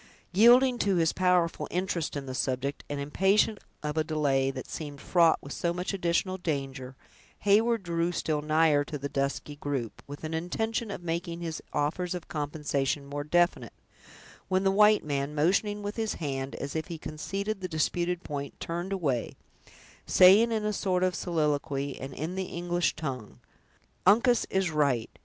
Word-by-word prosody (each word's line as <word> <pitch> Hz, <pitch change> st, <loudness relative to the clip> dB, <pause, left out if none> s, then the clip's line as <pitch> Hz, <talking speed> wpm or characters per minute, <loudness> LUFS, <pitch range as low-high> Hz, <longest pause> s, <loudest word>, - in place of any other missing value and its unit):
Yielding 245 Hz, +5 st, +6 dB
to 200 Hz, -2 st, +2 dB
his 165 Hz, -2 st, +2 dB
powerful 180 Hz, -2 st, +1 dB
interest 175 Hz, -4 st, -2 dB
in 140 Hz, -, -5 dB
the 130 Hz, -, -5 dB
subject, 130 Hz, +2 st, -2 dB
and 145 Hz, -1 st, -3 dB
impatient 195 Hz, +8 st, +2 dB, 0.2 s
of 150 Hz, +1 st, -3 dB
a 155 Hz, -, +3 dB
delay 145 Hz, -4 st, +1 dB
that 130 Hz, -1 st, -6 dB
seemed 145 Hz, -3 st, -6 dB
fraught 170 Hz, 0 st, +4 dB
with 140 Hz, -, -7 dB
so 170 Hz, -1 st, -1 dB
much 180 Hz, +3 st, -3 dB
additional 185 Hz, +1 st, 0 dB
danger, 135 Hz, -5 st, -4 dB, 0.5 s
Heyward 220 Hz, +2 st, +3 dB
drew 170 Hz, 0 st, 0 dB
still 155 Hz, -3 st, -1 dB
nigher 155 Hz, -1 st, +3 dB
to 150 Hz, -, -5 dB
the 140 Hz, 0 st, -4 dB
dusky 140 Hz, +1 st, -2 dB
group, 140 Hz, -6 st, -4 dB
with 145 Hz, +2 st, -9 dB
an 155 Hz, +1 st, -4 dB
intention 220 Hz, +7 st, -2 dB
of 190 Hz, -3 st, -6 dB
making 170 Hz, 0 st, -3 dB
his 165 Hz, -2 st, -4 dB
offers 165 Hz, +5 st, -1 dB
of 175 Hz, -, -7 dB
compensation 145 Hz, -2 st, -2 dB
more 145 Hz, +1 st, -4 dB
definite, 175 Hz, +3 st, +1 dB, 0.7 s
when 190 Hz, 0 st, +1 dB
the 195 Hz, -, +3 dB
white 210 Hz, +1 st, +5 dB
man, 145 Hz, 0 st, -2 dB
motioning 200 Hz, +7 st, +1 dB
with 205 Hz, +2 st, -4 dB
his 220 Hz, -1 st, -1 dB
hand, 135 Hz, -3 st, -4 dB
as 140 Hz, +2 st, -5 dB
if 160 Hz, -1 st, -2 dB
he 170 Hz, -2 st, -5 dB
conceded 195 Hz, +7 st, -4 dB
the 185 Hz, -, -2 dB
disputed 175 Hz, +2 st, -1 dB
point, 140 Hz, -1 st, -6 dB
turned 175 Hz, +3 st, -4 dB
away, 145 Hz, -11 st, -1 dB, 0.7 s
saying 200 Hz, +6 st, +7 dB
in 215 Hz, -2 st, -1 dB
a 210 Hz, -, 0 dB
sort 185 Hz, -2 st, 0 dB
of 185 Hz, 0 st, +2 dB
soliloquy, 145 Hz, -5 st, -1 dB
and 135 Hz, 0 st, -7 dB
in 160 Hz, +4 st, -4 dB
the 190 Hz, 0 st, -2 dB
English 175 Hz, 0 st, -1 dB
tongue: 130 Hz, -9 st, -6 dB, 0.7 s
"Uncas 235 Hz, +4 st, +4 dB
is 190 Hz, -3 st, 0 dB
right! 140 Hz, -7 st, +1 dB
165 Hz, 170 wpm, -28 LUFS, 145-190 Hz, 0.7 s, saying